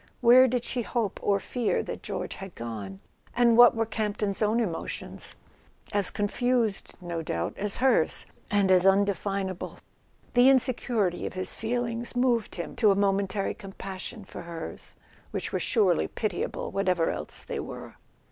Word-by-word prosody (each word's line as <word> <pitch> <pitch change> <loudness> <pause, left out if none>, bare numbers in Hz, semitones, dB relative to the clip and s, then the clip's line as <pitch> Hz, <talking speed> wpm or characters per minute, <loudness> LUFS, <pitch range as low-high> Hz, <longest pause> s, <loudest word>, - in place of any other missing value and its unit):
Where 250 +2 +7
did 250 -1 -1
she 245 - -2
hope 230 -3 -2
or 200 -1 +2
fear 240 +3 -1
that - - -6
George - - -4
had 195 -2 -9
gone? 105 -5 -6 0.3
And 240 -1 +5
what 240 0 +8
were 225 0 +1
Camp 215 -2 -2
ton's 200 -1 -2
own 215 +2 +2
emotions? 185 -8 -4 0.6
As 200 -2 +3
confused, 230 +1 0
no 170 -2 -4
doubt, 85 - -2
as 205 0 -1
hers—as 195 -4 +2
undefinable. 195 -1 0 0.6
The 245 +2 +7
insecurity 240 -8 +1
of - - -7
his 185 0 -3
feelings 235 +1 -2
moved 245 -3 +1
him 170 - -5
to 215 - +5
a 195 - +4
momentary 195 0 +1
compassion 195 +2 -8
for - - -9
hers, 170 -1 -7 0.3
which - - -4
were - - +1
surely 200 -8 +2
pitiable, 210 -5 -3
what¬ 195 -1 0
ever 175 -3 +2
else - - -4
they - - -4
were. - - -7
205 Hz, 150 wpm, -27 LUFS, 190-235 Hz, 0.6 s, what